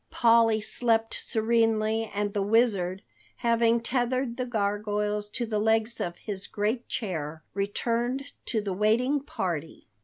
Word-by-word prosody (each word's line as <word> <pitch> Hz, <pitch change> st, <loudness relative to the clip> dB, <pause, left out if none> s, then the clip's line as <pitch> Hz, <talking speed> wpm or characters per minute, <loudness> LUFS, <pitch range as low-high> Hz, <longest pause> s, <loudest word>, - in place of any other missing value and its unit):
Polly 230 Hz, -2 st, +4 dB
slept 225 Hz, +1 st, +1 dB
serenely 225 Hz, -1 st, +1 dB
and 205 Hz, 0 st, -2 dB
the 205 Hz, -, 0 dB
Wizard, 200 Hz, -4 st, +2 dB, 0.3 s
having 235 Hz, -1 st, +3 dB
tethered 245 Hz, +1 st, -1 dB
the 255 Hz, 0 st, -3 dB
gargoyles 210 Hz, -1 st, -1 dB
to 240 Hz, +3 st, -2 dB
the 215 Hz, -2 st, -1 dB
legs 220 Hz, +2 st, +1 dB
of 175 Hz, 0 st, -3 dB
his 200 Hz, -3 st, -4 dB
great 220 Hz, +4 st, -1 dB
chair, 160 Hz, -7 st, -4 dB
returned 235 Hz, +7 st, -1 dB, 0.2 s
to 220 Hz, -, 0 dB
the 200 Hz, -2 st, -3 dB
waiting 230 Hz, +8 st, +2 dB
party. 170 Hz, -, -4 dB
220 Hz, 130 wpm, -27 LUFS, 205-235 Hz, 0.3 s, Polly